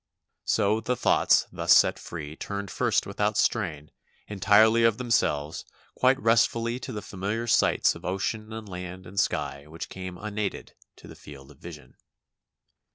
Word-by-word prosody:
So 105 0 +2
the 125 +3 -1
thoughts - - +3
thus - - +4
set - - +3
free 75 -3 -8
turned 100 +1 -5
first - - +1
without - - -1
strain, 75 -1 -1 0.4
entirely 110 +3 +4
of 115 -2 +3
themselves, 80 - 0 0.3
quite 130 +1 +3
restfully 115 +1 +2
to 130 - -7
the 105 -3 -6
familiar 105 +5 -4
sights 115 - +3
of - - -12
ocean 105 +4 -3
and 110 -1 -7
land 90 0 -8
and 95 +2 -4
sky 70 -3 -2
which 80 +1 -8
came 95 -1 -7
unaided 105 0 -5 0.2
to - - -15
the - - -11
field 70 -1 -13
of 70 - -19
vision. 80 -4 -12
100 Hz, 155 wpm, -26 LUFS, 85-110 Hz, 0.4 s, thus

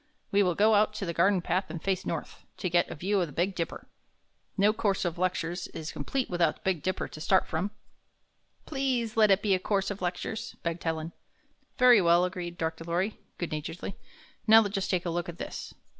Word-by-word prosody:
We 200 - +4
will 180 -3 +2
go 215 +2 +4
out 210 0 +3
to 200 - -3
the 170 - -2
garden 180 +2 +3
path 185 +2 0
and 165 +1 -5
face 190 +2 -1
north, - - -5
to 185 - -2
get 175 0 +3
a - - -5
view 195 +5 0
of 175 - 0
the - - -10
Big 180 +7 0
Dipper. 170 -2 -4 0.7
No 205 +2 +4
course 200 -4 0
of 175 0 -2
lec 185 +1 +2
tures 170 +2 -4
is 155 - -5
complete 255 - -2
without 170 -3 +1
the - - -24
Big 185 -5 0
Dipper 185 +3 -2
to 155 - -10
start 190 +4 +3
from." 175 +5 -2 1.0
''Please 260 -6 -1
let 215 -2 +5
it 195 +1 +4
be 205 -2 +3
a 185 - +2
course 195 +1 0
of 200 - -6
lectures," 185 +5 -3
begged 170 0 -3
Helen. 160 0 -2 0.7
"Very 250 -4 +7
well," 170 +1 +5
agreed 175 -2 -5
Dr. 160 0 -3
Lorry, 175 +5 -1 0.2
good 175 - -4
naturedly. 155 +5 -5 0.5
"Now 220 -1 +8
just 195 -1 -2
take 180 -1 0
a 170 - -1
look 175 0 -2
at 170 - -7
this." - - -6
185 Hz, 215 wpm, -29 LUFS, 170-205 Hz, 1.0 s, Now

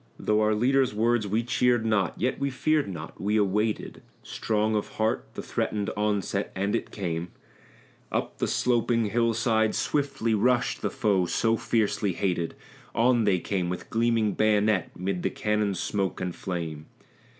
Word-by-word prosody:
Though 105 0 +1
our 105 0 +3
leader's 130 +1 +2
words 115 0 +2
we 110 +4 0
cheered 120 -1 +2
not, 105 -6 +1
yet 130 - 0
we 140 0 0
feared 150 +3 +1
not; 80 -4 -8
we 105 +2 +1
awaited, 105 +2 0 0.2
Strong 110 0 0
of 105 - -2
heart, 110 - 0
the - - -5
threatened 105 -2 -2
onset, 105 -2 -1
and 100 +2 0
it - - -3
came: 85 -4 -3 0.8
Up - - -2
the - - +1
sloping 115 -3 +1
hill 115 0 +2
side 110 -1 +2
swiftly 140 -6 0
rushed 120 +3 +2
the - - 0
foe 100 -8 +1
so 115 +5 +2
fiercely 105 -4 0
hated; 85 -3 -1 0.4
On 120 -1 +3
they 100 -3 +3
came 90 -1 -2
with 90 - -6
gleaming 115 -2 +2
bayonet 105 -3 +2
'mid 90 0 -2
the - - 0
cannon's 105 -2 -1
smoke 95 -2 -1
and 90 -1 -3
flame. 80 -4 -5
105 Hz, 160 wpm, -27 LUFS, 95-115 Hz, 0.8 s, our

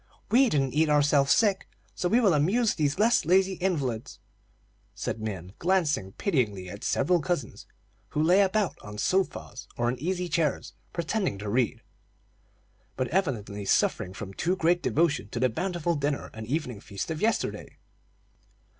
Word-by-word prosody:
We 255 +2 +5
didn't 135 - 0
eat 155 +2 +2
ourselves 145 -1 +3
sick, 205 -4 +2 0.2
so 175 - -1
we 230 - +4
will 205 -7 +4
amuse 200 +10 +2
these 145 -3 0
lazy 190 -3 +3
invalids;" 135 -12 -2 0.9
and - - -2
Min 95 -4 -5
glanced 175 -4 +2 0.2
pityingly 105 - -1
at 100 - -9
several 170 +5 +2
cousins 175 -2 -3 0.4
who 150 - 0
lay 180 +5 +5
about 200 0 +1
on 105 -1 -9
sofas 190 - -1
or 120 0 +1
in 125 - -3
easy 180 +4 -2
chairs, 155 -3 -1 0.2
pretending 170 - -1
to 105 +1 -6
read, 120 +1 0 1.1
but 130 - -1
evidently 115 - -1
suffering 95 -1 +1
from 95 -1 -7
too 175 - 0
great 175 0 +2
devotion 150 -9 +1
to 120 - -4
the 130 +1 +3
bountiful 175 +6 -1
dinner 145 -2 -2
and 110 0 -8
evening 125 -5 -2
feast 100 +9 -5
of 160 - -4
yesterday. 225 +1 -1
155 Hz, 150 wpm, -27 LUFS, 120-185 Hz, 1.1 s, We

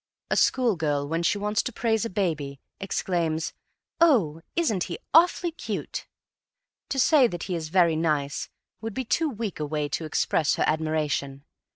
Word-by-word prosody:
A - - +3
school 245 -5 +3
girl, 145 -3 0
when 165 +3 -1
she 170 - +2
wants 210 +2 0
to - - -4
praise 225 -1 0
a - - -2
baby, 155 -8 -2 0.2
exclaims: 170 -4 -1 0.5
"Oh, 210 - +4
isn't 220 - +1
he 170 - -5 0.2
awfully 345 +1 +5
cute!" 330 - -5 0.8
To 275 - -2
say 270 0 +5
that 175 -6 -5
he 185 - -3
is 160 -2 -3
very 170 -2 +4
nice 150 -3 -1 0.3
would 225 -2 -5
be 260 - -2
too 320 +7 +1
weak 220 - -4
a 150 - -1
way 150 0 -1
to 160 +3 -3
express 155 0 +1
her - - +1
admiration. 150 -3 -1
170 Hz, 170 wpm, -26 LUFS, 155-230 Hz, 0.8 s, awfully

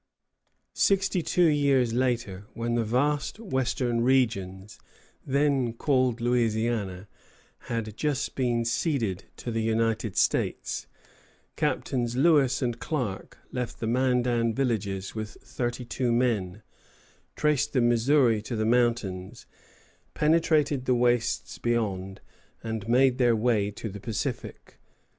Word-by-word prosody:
Sixty 195 -2 +2
two 175 +2 +2
years 140 -6 +3
later, 115 -6 -1
when 120 0 -2
the 120 -1 +1
vast 140 - 0
western 130 - -1
regions 105 -7 0 0.5
then 135 -3 +1
called 130 -1 +1
Louisiana 110 -5 0 0.6
had 110 -3 -3
just 150 -3 -1
been 120 -3 0
ceded 115 - -1
to 120 - -5
the 115 0 -1
United 110 -1 0
States, - - 0 0.7
Captains 120 -2 -1
Lewis 140 -3 +3
and 120 -1 -2
Clark 125 - -4
left 125 -2 -4
the - - -3
Mandan 120 -1 +1
villages 100 -7 -2
with 110 -1 -6
thirty 125 -1 -4
two 120 0 -1
men, 110 -5 0 0.7
traced 150 -1 +1
the 130 - +3
Missouri 120 -1 +3
to 115 +3 -5
the 110 0 0
mountains, 115 -4 0 0.7
penetrated 150 -3 +2
the 125 - +2
wastes 120 -1 0
beyond, 100 -5 -2 0.4
and 110 -1 -4
made 130 +1 +4
their 120 -2 +4
way 110 -3 +1
to 105 +2 -7
the 100 -1 -7
Pacific. 110 0 -5
120 Hz, 115 wpm, -27 LUFS, 110-130 Hz, 0.7 s, made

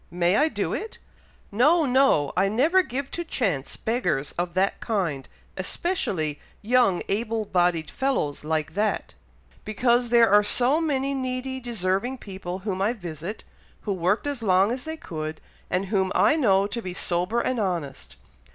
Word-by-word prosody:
May 175 +2 +1
I 300 +7 +4
do - - -2
it?" 445 - -5 0.5
"No! 300 +10 +4
no! 255 - +3
I 195 +2 +3
never 300 - +3
give 275 -4 -5
to 345 - -3
chance 195 - -2
beggars 180 - -1
of 175 0 -4
that 190 +1 +1
kind, 175 - -2 0.3
especially 175 - -2 0.2
young 235 -5 +3
able 220 +1 -1
bodied 175 -5 +1
fellows 255 - -1
like 155 0 -2
that, 210 +3 -1 0.5
because 240 +3 +1
there 235 -3 +5
are 210 0 +6
so 255 +9 +2
many 275 -3 0
needy, 260 0 -3
deserving 235 +1 -1
people 190 -5 -6
whom 190 -3 -2
I 210 +4 +2
visit, 175 -1 -7 0.4
who 205 - -2
worked 185 +6 0
as 285 -4 -3
long 195 0 +3
as 250 +1 -4
they 320 0 -5
could, 155 - -6 0.3
and 185 +2 0
whom 190 -1 0
I - - +4
know 200 -10 +3
to 230 +4 -4
be 180 -4 -6
sober 180 +6 0
and 250 0 -1
honest. 170 -9 -3
210 Hz, 160 wpm, -25 LUFS, 180-255 Hz, 0.5 s, are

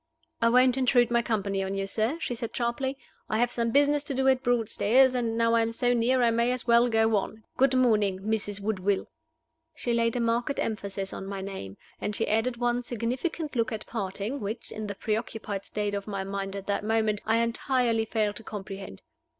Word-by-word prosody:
"I 230 - +5
won't 250 +1 +4
intrude 245 -2 +3
my 235 0 +3
company 200 -4 -1
on 190 0 -2
you, 195 0 -1
sir," 220 +9 0
she 280 - -2
said, 230 -1 -5
sharply. 260 +3 -1 0.3
"I 215 - +1
have 240 +1 +2
some 235 -1 0
business 290 +3 +3
to 280 -3 -3
do 265 +1 +1
at 260 -1 +3
Broadstairs, 245 +1 +3
and, 230 -2 -1
now 230 0 +3
I 230 - +4
am 225 0 0
so 245 +1 +1
near, 245 +2 +2
I 235 - +4
may 235 +2 +2
as 250 -1 -3
well 235 +1 +5
go 225 -1 +3
on. 220 +2 -4
Good 265 0 +3
morning, 215 -7 +3
Mrs. 205 -1 -1
Woodville." 200 -1 -1 0.6
She 240 - -1
laid 230 0 +1
a - - 0
marked 235 +4 0
emphasis 200 -3 -3
on 195 - -6
my 195 -1 -4
name, 190 - -7 0.2
and 210 - -3
she - - 0
added 225 +3 +1
one 240 0 0
significant 255 - -3
look 230 -2 +1
at 215 -1 -5
parting, 205 +4 -3
which 215 +2 -5
(in 215 0 -5
the 200 - -5
preoccupied 215 -2 -3
state 205 -1 -2
of 200 0 -4
my 195 -2 -3
mind 195 0 -4
at 195 -1 -6
that 200 0 -1
moment) 220 -1 +1
I 225 +1 +3
entirely 235 0 +1
failed 215 -2 -1
to 225 - -10
comprehend. 195 -2 -8
225 Hz, 205 wpm, -27 LUFS, 205-245 Hz, 0.6 s, I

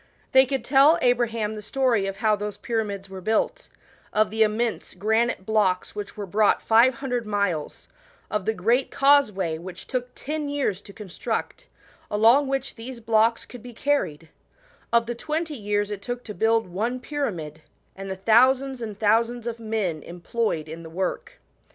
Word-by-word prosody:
They 265 0 +6
could 270 0 -2
tell 280 +4 +6
Abraham 230 -5 +1
the 215 - -7
story 235 -3 +1
of 195 - -4
how 215 +1 +2
those 205 0 -5
pyra 225 -2 -1
mids 200 -2 -6
were 190 -1 -9
built; 225 - -1 0.4
of 215 0 +2
the 220 +1 -2
immense 220 +1 0
granite 220 -1 0
blocks 200 -4 +1
which 205 0 -7
were 205 - -4
brought 205 +2 +3
five 235 +3 +5
hundred 245 -3 -3
miles; 200 -7 -2 0.4
of 210 -3 -2
the 220 - +2
great 235 +8 +1
causeway, 210 - +3
which 180 +1 -9
took 250 -1 -3
ten 300 0 -4
years 270 -9 -1
to 200 - -13
con 210 -1 -10
struct, - - -4 0.4
along 230 +7 +4
which 270 0 -2
these 240 +2 -8
blocks 225 0 +2
could 245 - -11
be 245 +1 -10
carried; 170 - -1 0.6
of 235 0 +4
the 240 - -3
twenty 310 +6 -3
years 205 -4 -1
it 205 -1 -5
took 245 +3 -5
to 210 - -7
build 225 +3 +2
one 220 +8 -2
pyramid, 180 - -4 0.3
and 195 0 -7
the 190 - -3
thousands 255 +6 +3
and 215 -3 -5
thousands 230 +3 +1
of 235 -1 -4
men 215 -8 -2
employed 175 -1 -3
i$L 160 +2 -8
the 165 - -10
work. 185 - -3
220 Hz, 175 wpm, -25 LUFS, 200-250 Hz, 0.6 s, They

